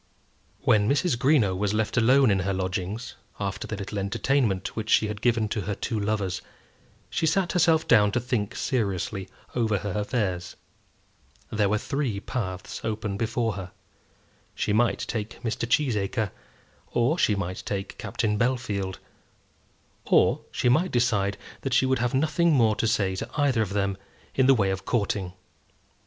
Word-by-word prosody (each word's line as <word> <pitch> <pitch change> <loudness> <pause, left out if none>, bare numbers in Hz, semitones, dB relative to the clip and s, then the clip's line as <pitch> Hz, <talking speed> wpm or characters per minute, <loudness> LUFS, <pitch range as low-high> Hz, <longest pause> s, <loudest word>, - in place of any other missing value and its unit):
When 105 0 +3
Mrs. 145 +1 +2
Greenow 120 -7 +3
was 105 +2 0
left 110 0 0
alone 125 +1 +5
in 95 - +2
her 95 +1 -1
lodgings, 95 +5 -3 0.3
after 100 -2 -3
the 110 - -3
little 100 0 -4
entertainment 110 0 0
which 110 -1 -4
she 110 - +4
had 105 -1 -5
given 115 -3 +2
to 105 - -1
her 100 +1 -3
two 115 +1 -2
lovers, 100 -3 -1 0.7
she 160 - 0
sat 175 +2 +1
herself 165 -3 +3
down 105 -3 +5
to - - +2
think 120 -4 -2
seriously 100 -5 -2 0.2
over 110 -4 +1
her 100 +1 -4
affairs. 100 -3 -2 1.0
There 105 -2 +2
were 105 - +2
three 135 -4 -2
paths 95 -5 -4
open 110 -2 -2
before 115 +1 -1
her. 95 -1 -7 0.8
She 105 - 0
might 120 +3 +2
take 110 -1 -4
Mr. 115 0 -2
Cheesacre, 110 - +1 0.6
or 130 +9 +1
she 105 - +3
might 95 -2 -3
take 95 -1 -4
Captain 105 -1 -1
Bellfield 105 -7 -1 1.1
or - - +4
she - - -1
might 155 +9 +3
decide 105 -5 +1 0.2
that 135 -2 -1
she - - +4
would 130 -1 +1
have 125 +1 0
nothing 160 +4 +2
more 115 -6 +4
to 115 - +1
say 95 -4 +1
to 115 +5 -4
either 135 -6 +3
of 100 -3 -2
them 100 -1 0 0.4
in 130 -1 +3
the 135 - +7
way 100 -4 +2
of 95 0 -3
courting. 100 -5 -1
110 Hz, 160 wpm, -26 LUFS, 100-125 Hz, 1.1 s, the